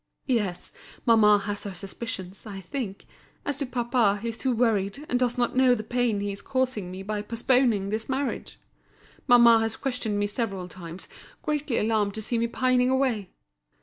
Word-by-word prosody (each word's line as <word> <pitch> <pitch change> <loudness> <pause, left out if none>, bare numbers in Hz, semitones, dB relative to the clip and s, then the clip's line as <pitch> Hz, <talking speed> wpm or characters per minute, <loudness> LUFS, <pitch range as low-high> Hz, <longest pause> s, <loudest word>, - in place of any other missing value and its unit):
"Yes, 210 -9 -1 0.3
mamma 215 -3 +6
has 205 0 -4
her 200 -2 -6
suspicions, 195 0 -7
I 200 -2 -6
think. 200 0 -5 0.4
As 285 -2 -2
to 280 -2 -2
papa, 240 -4 +2
he 230 +3 -3
is 230 - -4
too 260 - 0
worried, 225 +2 +1
and 250 - +1
does 245 -1 +1
not 245 0 +1
know 255 -1 +5
the 215 - -5
pain 240 -2 0
he 205 0 -2
is 200 - -7
causing 255 -8 -1
me 185 +1 -7
by 210 +1 -2
postponing 230 -2 +1
this 220 +4 -3
marriage. 270 +1 -2 0.7
Mamma 235 -2 +7
has 225 0 -1
questioned 245 -6 -2
me 205 - +1
several 200 -4 -3
times, 175 0 -9 0.4
greatly 295 -5 -1
alarmed 210 -2 +1
to 220 - -4
see 235 +2 -1
me 235 - +1
pining 250 +1 +2
away. 255 -7 +1
225 Hz, 180 wpm, -26 LUFS, 200-250 Hz, 0.7 s, Mamma